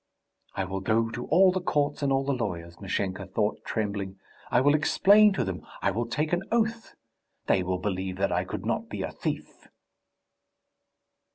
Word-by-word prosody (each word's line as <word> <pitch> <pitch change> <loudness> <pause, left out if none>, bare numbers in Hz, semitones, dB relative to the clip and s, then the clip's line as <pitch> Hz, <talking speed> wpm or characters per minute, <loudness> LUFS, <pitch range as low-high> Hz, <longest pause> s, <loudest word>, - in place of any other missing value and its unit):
"I 100 - 0
will 95 +1 -3
go 115 +3 +1
to 120 +2 -5
all 185 +4 +6
the 185 0 -2
courts 145 -4 0
and 140 -1 +1
all 135 0 +2
the 140 - +1
lawyers," 85 -8 -4
Mashenka 95 0 -2
thought, 105 +2 -1
trembling. 100 -3 -3 0.3
"I - - +4
will 145 +3 +4
explain 200 +7 +5
to - - 0
them, 95 -2 -4 0.2
I 100 - +3
will 115 +4 -2
take 150 +8 -1
an 175 - +2
oath.... 225 -1 0 0.5
They 95 - +3
will 90 0 -1
believe 95 -1 -3
that 100 0 0
I - - +1
could - - -6
not - - -1
be - - -4
a - - -4
thief!" - - -5
115 Hz, 180 wpm, -27 LUFS, 95-150 Hz, 0.5 s, all